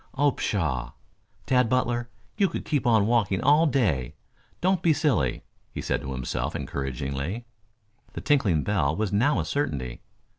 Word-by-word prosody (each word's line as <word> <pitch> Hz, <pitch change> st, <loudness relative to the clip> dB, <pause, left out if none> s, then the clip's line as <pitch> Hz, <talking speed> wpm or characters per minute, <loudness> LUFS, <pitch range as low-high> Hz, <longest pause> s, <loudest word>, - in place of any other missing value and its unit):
Oh, 145 Hz, +1 st, +3 dB
pshaw! 70 Hz, -, -2 dB, 0.5 s
Tad 125 Hz, -3 st, +3 dB
Butler, 120 Hz, -1 st, 0 dB, 0.3 s
you 200 Hz, -3 st, +2 dB
could -, -, -5 dB
keep 145 Hz, -4 st, 0 dB
on 110 Hz, -4 st, +4 dB
walking 105 Hz, -5 st, +2 dB
all 150 Hz, +3 st, +4 dB
day. 90 Hz, -, 0 dB, 0.4 s
Don't 185 Hz, -1 st, +2 dB
be 165 Hz, -3 st, +4 dB
silly," 105 Hz, -, 0 dB, 0.3 s
he -, -, -6 dB
said -, -, -1 dB
to 65 Hz, -, -5 dB
himself 65 Hz, -1 st, -3 dB
encouragingly. 70 Hz, -, -4 dB, 0.7 s
The -, -, -5 dB
tinkling 100 Hz, -, +2 dB
bell 80 Hz, -8 st, +1 dB
was 105 Hz, +1 st, -2 dB
now 125 Hz, +8 st, +3 dB
a -, -, -1 dB
certainty. 65 Hz, -, -2 dB
110 Hz, 150 wpm, -26 LUFS, -, 0.7 s, on